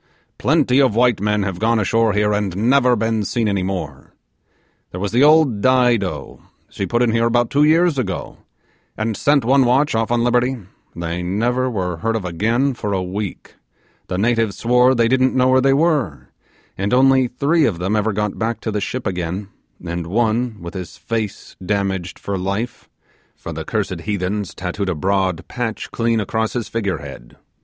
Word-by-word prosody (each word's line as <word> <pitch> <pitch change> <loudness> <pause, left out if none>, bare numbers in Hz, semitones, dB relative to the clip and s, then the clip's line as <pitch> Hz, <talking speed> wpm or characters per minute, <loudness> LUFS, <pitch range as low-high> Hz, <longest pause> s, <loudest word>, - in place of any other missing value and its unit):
Plenty 140 -2 +3
of 130 -6 +2
white 120 -4 +3
men 105 0 +1
have 95 -2 -4
gone 115 +1 +2
ashore 110 +1 +2
here 105 0 +1
and 100 -3 -2
never 125 +3 +3
been 110 -1 0
seen 115 +2 -1
any 100 -2 0
more. 80 -8 -5 0.7
There 90 - -7
was 100 +1 -2
the 120 +4 +3
old 150 -8 +4
Dido, 115 - +1 0.3
she 100 - -3
put 120 +1 +1
in 120 - +2
here 115 +1 +2
about 120 0 +1
two 145 +1 +3
years 160 -1 +3
ago, 95 -7 -4 0.6
and 110 0 -1
sent 140 0 +2
one 135 +2 +4
watch 130 +4 +2
off 115 0 0
on 120 0 +1
liberty; 125 +2 +1 0.4
they 85 +1 -4
never 120 +8 0
were 90 -7 -3
heard 115 +6 -1
of 110 -4 -3
again 115 +10 0
for 105 -4 -3
a 95 -1 -1
week 95 +1 -5 0.5
the 90 - -3
natives 115 0 +1
swore 125 +2 +3
they 115 -1 +3
didn't 130 +1 +2
know 130 0 +3
where 130 0 +4
they 135 +1 +3
were 140 - 0 0.5
and 100 +5 0
only 130 0 +4
three 145 +6 +1
of 105 -9 0
them 95 +5 -1
ever 110 +1 +1
got 105 0 -2
back 115 0 -1
to 110 - -3
the 105 -1 -2
ship 125 +6 -4
again, 90 +1 -3 0.4
and 85 -1 -4
one 115 +3 0
with 85 0 -7
his 90 -4 -7
face 110 -3 -4
damaged 95 -2 -2
for 100 -2 -4
life, 100 +6 -4 0.5
for - - -8
the - - -5
cursed - - -3
heathens 100 -1 -3
tattooed 95 +2 -3
a 90 - -1
broad 95 0 -1
patch 115 -3 -4
clean 115 -1 0
across 110 +2 -1
his 120 -3 -3
figure 100 -6 -2
head. - - -11
110 Hz, 185 wpm, -19 LUFS, 95-125 Hz, 0.7 s, old